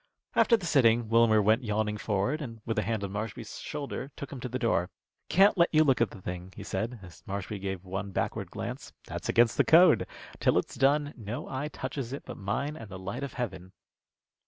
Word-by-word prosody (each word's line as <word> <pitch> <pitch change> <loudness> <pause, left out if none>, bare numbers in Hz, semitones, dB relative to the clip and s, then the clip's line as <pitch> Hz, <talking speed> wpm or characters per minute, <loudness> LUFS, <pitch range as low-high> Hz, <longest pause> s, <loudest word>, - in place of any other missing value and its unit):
After 230 - +5
the 195 - -7
sitting, 120 -7 +4
Wilmer 115 -2 +5
went 110 +5 +3
yawning 105 -1 0
forward, 105 +10 0
and 115 -5 -7
with 115 -1 0
a - - +2
hand 110 -1 -2
on 100 - -3
Marshby's 105 +2 -5
shoulder, 140 -1 -5
took 140 - -7
him 135 - -6
to 125 +1 -5
the 125 - -2
door. 110 -8 +1 0.4
"Can't 195 +1 +5
let 170 - +5
you 155 0 +5
look 135 -5 +3
at 115 - +3
the - - -11
thing," 90 +1 -6
he - - -8
said, 115 +6 -3
as 90 -2 -13
Marshby 100 +1 -4
gave 95 -1 -4
one 95 +2 -4
backward 95 - -2
glance. - - -6
"That's - - -5
against 115 -1 +4
the - - +5
code. 165 0 +6 0.3
Till - - +3
it's - - -1
done, 145 +2 +2
no 110 0 -6
eye 135 +2 -3
touches 135 -4 -5
it 140 - -6
but 125 - -7
mine 110 +10 -2
and 115 -8 -9
the 95 - -7
light 95 +6 -5
of 140 - -4
heaven." 95 -7 -5
115 Hz, 215 wpm, -29 LUFS, 100-140 Hz, 0.4 s, code